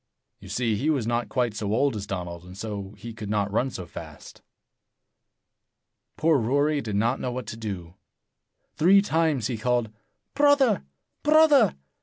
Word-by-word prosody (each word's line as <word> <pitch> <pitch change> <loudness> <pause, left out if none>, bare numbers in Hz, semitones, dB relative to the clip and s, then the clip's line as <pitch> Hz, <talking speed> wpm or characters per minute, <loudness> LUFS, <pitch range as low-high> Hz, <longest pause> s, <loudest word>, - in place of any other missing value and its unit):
You - - -12
see, 120 -3 0
he 145 +9 0
was 140 -8 +1
not 120 +1 -1
quite 125 -4 0
so 105 -1 -3
old 130 +3 +2
as 100 -1 -5
Donald, 90 -3 -5
and 90 +1 -12
so 100 -1 -6
he 115 -1 -8
could 105 -2 -7
not 105 -1 0
run 125 +5 +1
so 90 -7 -7
fast. - - -11 1.8
Poor 160 -2 +3
Rory 145 +5 +1
did 105 -5 -4
not 115 +6 +1
know 125 - -3
what 125 -1 -5
to 115 - -6
do. 95 -7 -6 0.8
Three 195 +5 +5
times 160 - +1
he 120 -2 -2
called, 120 -2 0 0.4
"Brother! 285 -6 +4 0.4
Brother! 305 - +5
120 Hz, 160 wpm, -25 LUFS, 105-150 Hz, 1.8 s, Three